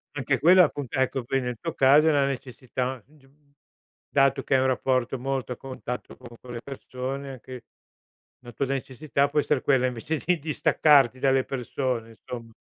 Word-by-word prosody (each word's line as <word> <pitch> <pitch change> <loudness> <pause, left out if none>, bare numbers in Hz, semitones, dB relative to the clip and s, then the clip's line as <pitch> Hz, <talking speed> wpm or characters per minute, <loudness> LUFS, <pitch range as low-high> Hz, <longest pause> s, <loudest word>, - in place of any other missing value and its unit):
Anche 135 -1 0
quella 180 +4 +7
è - - +7
appunt 140 -5 -5
ecco 130 0 0
qui 135 +2 0
nel 125 -2 -4
tuo 165 - -4
caso 145 +2 +5
è - - +5
na 140 -2 +3
necessità, 130 -1 -4
g 150 -1 -24
uhm, 140 +1 -29 0.6
dato 135 -1 +2
che - - -1
hai 130 - +4
un 130 - +2
rapporto 130 0 0
molto 130 -1 -3
a - - -13
contatto 130 -2 -7
con 125 - -12
con 125 -1 -10
le 115 - -6
persone, 135 +1 -6
anche 130 -1 -10 0.8
la 120 - -10
tua 120 +4 -2
necessità 135 +1 -1
può 150 +1 +1
essere 145 -2 +1
quella 130 -2 +3
invece 125 +6 -3
di 180 0 +2
distaccarti 145 -3 +3
dalle 135 0 +2
persone, 125 -3 -3
insomma, 115 +1 -9
135 Hz, 185 wpm, -26 LUFS, 125-140 Hz, 0.8 s, quella